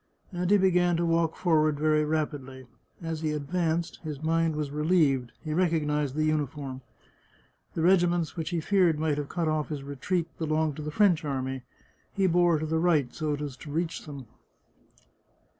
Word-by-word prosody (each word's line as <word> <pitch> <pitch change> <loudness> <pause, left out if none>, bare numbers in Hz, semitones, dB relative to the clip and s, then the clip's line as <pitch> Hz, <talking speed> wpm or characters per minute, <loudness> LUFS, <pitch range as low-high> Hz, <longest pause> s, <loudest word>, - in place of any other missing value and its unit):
And 180 -1 -2
he 205 - +6
be 190 -1 +3
gan 175 -1 +3
to 170 - 0
walk 165 -1 +1
forward 155 -4 +2
very 155 0 +3
rapidly. 145 -4 -3 0.4
As 165 -1 -3
he 155 -1 -1
advanced, 165 +2 -1
his 155 -2 -6
mind 165 0 +1
was 150 -2 -3
relieved; 150 -5 +2
he 155 - -3
recognised 150 -5 0
the 155 - +1
uniform. 145 -3 -2 0.9
The 160 - -1
regi 175 0 +5
ments 170 -2 -1
which 165 -3 -3
he 170 -3 -1
feared 180 -3 +3
might 150 -1 0
have 145 - -5
cut 170 -2 -1
off 155 -1 0
his 145 -3 -4
retreat 145 +5 -2
be 160 - -1
longed 155 -1 0
to - - -5
the 150 - -4
French 175 -1 +3
army; 130 -2 -3 0.5
he 195 -2 +1
bore 175 -2 +4
to 155 - -3
the 160 +1 0
right, 155 -7 +2
so 155 -2 -1
as 145 -2 -5
to 150 - -10
reach 165 +2 -3
them. 140 -3 -8
155 Hz, 185 wpm, -28 LUFS, 150-170 Hz, 0.9 s, he